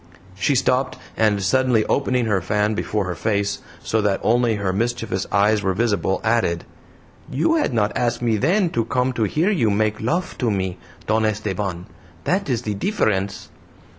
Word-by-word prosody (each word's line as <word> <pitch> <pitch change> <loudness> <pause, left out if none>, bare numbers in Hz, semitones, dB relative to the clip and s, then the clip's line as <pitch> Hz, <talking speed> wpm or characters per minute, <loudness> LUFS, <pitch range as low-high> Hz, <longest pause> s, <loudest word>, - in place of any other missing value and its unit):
She 120 +9 +1
stopped, 130 +1 +1 0.2
and 105 -3 +2
suddenly 125 +2 +2
opening 125 -3 +1
her 105 -4 +1
fan 105 +4 0
before 105 -1 -1
her 90 - -2
face, 100 +1 -1 0.2
so 110 - +1
that 100 -2 +1
only 120 0 +3
her 100 -2 -1
mischievous 115 -2 -2
eyes 105 +1 +3
were 95 -2 0
visible, 100 -4 +1
added: 110 -7 +1 0.7
"You 240 - +2
had 305 - +1
not 105 -3 0
asked 120 0 0
me 115 -2 +2
then 175 - +2
to 115 - 0
come 125 +2 0
to 115 -3 0
hear 160 - +1
you 135 - +2
make 105 +1 0
lof 170 +11 -2
to 125 - +1
me, 95 -3 -2 0.3
Don 110 +3 +1
Esteban. 100 -4 -2 0.4
That 190 -3 0
is 120 -2 0
the 105 - -2
difference." 100 - -1
110 Hz, 170 wpm, -22 LUFS, 100-125 Hz, 0.7 s, only